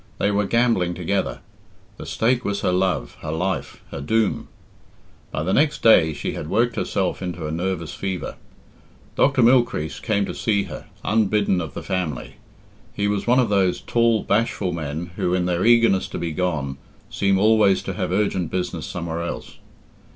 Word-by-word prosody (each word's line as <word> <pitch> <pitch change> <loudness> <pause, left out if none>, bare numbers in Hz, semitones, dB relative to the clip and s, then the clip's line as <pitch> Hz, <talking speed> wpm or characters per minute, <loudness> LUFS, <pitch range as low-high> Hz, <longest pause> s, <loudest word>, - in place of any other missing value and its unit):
They 100 - +1
were 100 0 +1
gambling 115 -7 +2
together. - - -2 0.6
The - - -8
stake 125 +2 +1
was 100 0 -2
her - - +1
love, 90 -9 0
her 75 - -4
life, 90 +4 -3
her 70 - -5
doom. 110 +8 0 0.8
By 75 - -3
the 95 +4 0
next 150 +5 +2
day 90 -8 +6
she 70 - -4
had 75 - -6
worked 120 +4 +1
herself 95 -1 -1
into 90 -3 -4
a 75 - -3
nervous 85 0 -3
fever. 95 -2 -4 0.8
Dr. 135 -2 +3
Mylechreest 115 - +2
came 100 -2 +1
to - - -5
see 100 -3 0
her, 85 -8 -9 0.2
unbidden 105 -3 +2
of 80 -4 -7
the - - -5
family. 90 -7 -3 0.6
He 100 - 0
was 105 +1 -1
one 125 +2 +4
of 125 -4 +3
those 95 -3 +2
tall, 115 -2 +2
bashful 100 -3 0
men 80 +2 -4
who, 90 - +1
in 90 -1 0
their 90 -1 0
eagerness 115 -4 +4
to - - -6
be 85 -1 -3
gone, 75 -6 -2 0.3
seem 100 -1 +2
always 105 -1 +4
to 95 - -4
have 90 -1 -3
urgent 95 -3 0
business 90 -1 -3
somewhere 85 -1 -4
else. 85 - -6
95 Hz, 175 wpm, -22 LUFS, 85-110 Hz, 0.8 s, day